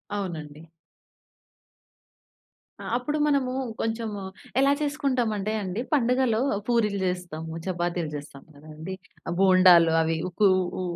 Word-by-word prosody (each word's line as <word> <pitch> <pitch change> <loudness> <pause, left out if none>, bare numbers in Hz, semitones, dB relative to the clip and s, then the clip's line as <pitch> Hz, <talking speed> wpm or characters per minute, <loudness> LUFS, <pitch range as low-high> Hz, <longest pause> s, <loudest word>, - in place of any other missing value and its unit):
అవునండి. 165 -5 -6 2.1
ఆ! - - -8
అప్పుడు 295 +5 -2
మనము 275 -3 +1 0.3
కొంచెం 225 0 -2 0.5
ఎలా 275 +1 +4
చేసుకుంటామంటే 255 -8 0
అండి, 190 +3 -3
పండుగలో 250 -3 +2 0.3
పూరీలు 215 -4 +1
జేస్తాము. 175 -3 -3
చపాతీలు 175 -3 -2
జేస్తాం 145 -1 -9
కదండి. 155 +5 -9 0.5
బోండాలు, 185 -3 +6
అవి 160 0 0
ఊకు 200 +3 +2 0.3
ఊ - - -1
190 Hz, 100 wpm, -26 LUFS, 165-235 Hz, 2.1 s, బోండాలు